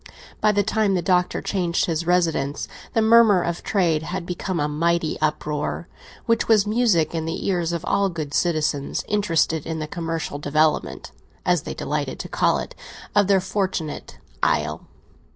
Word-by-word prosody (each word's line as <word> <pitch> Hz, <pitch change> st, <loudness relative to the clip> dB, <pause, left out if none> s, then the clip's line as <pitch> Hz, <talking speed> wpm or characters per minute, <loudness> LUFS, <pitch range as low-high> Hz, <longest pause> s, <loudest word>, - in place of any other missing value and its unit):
By 215 Hz, -, +4 dB
the 205 Hz, 0 st, +2 dB
time 215 Hz, -1 st, +1 dB
the 175 Hz, -, -1 dB
Doctor 180 Hz, +1 st, +1 dB
changed 175 Hz, -4 st, 0 dB
his 165 Hz, 0 st, -2 dB
residence 165 Hz, -5 st, +1 dB, 0.3 s
the 225 Hz, -, +3 dB
murmur 220 Hz, -5 st, +6 dB
of 170 Hz, 0 st, -3 dB
trade 170 Hz, -7 st, +1 dB
had 175 Hz, +2 st, -4 dB
become 180 Hz, 0 st, -3 dB
a 150 Hz, -, +1 dB
mighty 165 Hz, +2 st, 0 dB
uproar, 150 Hz, +1 st, -2 dB, 0.4 s
which 230 Hz, 0 st, +1 dB
was 215 Hz, -3 st, +4 dB
music 210 Hz, -8 st, +2 dB
in 160 Hz, -1 st, -2 dB
the 165 Hz, -, -4 dB
ears 175 Hz, -3 st, 0 dB
of 170 Hz, 0 st, -3 dB
all 200 Hz, 0 st, +2 dB
good 155 Hz, -5 st, -5 dB
citizens 155 Hz, -4 st, 0 dB
interested 165 Hz, -6 st, +1 dB
in 160 Hz, 0 st, -4 dB
the 155 Hz, -, -3 dB
commercial 165 Hz, -2 st, -4 dB
development, 150 Hz, +2 st, 0 dB, 0.3 s
as -, -, +2 dB
they -, -, -6 dB
delighted -, -, -3 dB
to -, -, -7 dB
call -, -, +2 dB
it, -, -, -6 dB, 0.4 s
of 205 Hz, -2 st, +4 dB
their 195 Hz, -1 st, +4 dB
fortunate 185 Hz, -5 st, -3 dB, 0.2 s
isle. 75 Hz, 0 st, 0 dB
170 Hz, 165 wpm, -23 LUFS, 155-195 Hz, 0.4 s, murmur